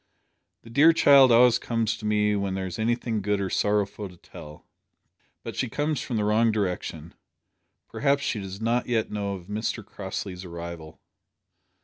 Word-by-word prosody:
The 115 - -13
dear 150 +6 +6
child 140 -5 +6
always 120 0 +6
comes 115 -2 -1
to 105 - -5
me 105 0 +2
when 100 -1 -2
there 95 0 -3
is 95 +3 -6
anything 115 -1 -1
good 105 0 0
or 95 -1 -3
sorrowful 105 -1 0
to 90 - -16
tell. 75 -2 -13 0.8
But - - -7
she 125 - -2
comes 150 +3 -1
from 120 - -3
the 105 - 0
wrong 110 +2 +3
direction. 90 -6 -3 0.7
Perhaps 140 -1 0
she 110 - -1
does 95 0 -7
not 115 +2 0
yet 115 -3 -1
know 100 -1 -3
of 90 -2 -10
Mr 105 +1 -3
Crossley's 95 -2 -6
arrival." 85 -2 -8
105 Hz, 165 wpm, -26 LUFS, 95-115 Hz, 0.8 s, dear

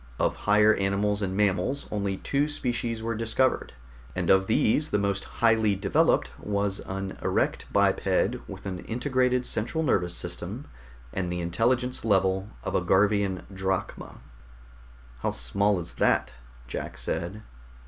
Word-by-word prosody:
Of - - +1
higher 105 +1 +6
animals 100 +1 0
and 95 -1 -2
mammals 105 +7 +1
only 100 -2 -1
two 140 +7 0
species 120 -5 -2
were 115 0 -1
discovered, 115 +4 0 0.4
and - - +1
of 95 0 +4
these 130 +7 +3
the - - +1
most 100 -1 -1
highly 110 -3 +2
developed 100 +1 +2
was 100 -1 -1
an 95 0 -5
erect - - 0
biped - - +2
with - - -9
an 95 -2 -4
integrated 125 +1 +1
central 140 +9 -1
nervous 90 - +1
system 90 +9 -5 0.5
and 90 -2 -2
the 90 0 -2
intelligence 120 +9 0
level 95 -2 +2
of - - -3
a - - +2
Garvian 100 -1 +2
drachma." 95 0 -3 1.0
"How - - 0
small 100 +11 +1
is 85 0 -7
that?" - - +1 0.3
Jack 60 - -5
said. 100 +6 -3
100 Hz, 140 wpm, -27 LUFS, 95-115 Hz, 1.0 s, higher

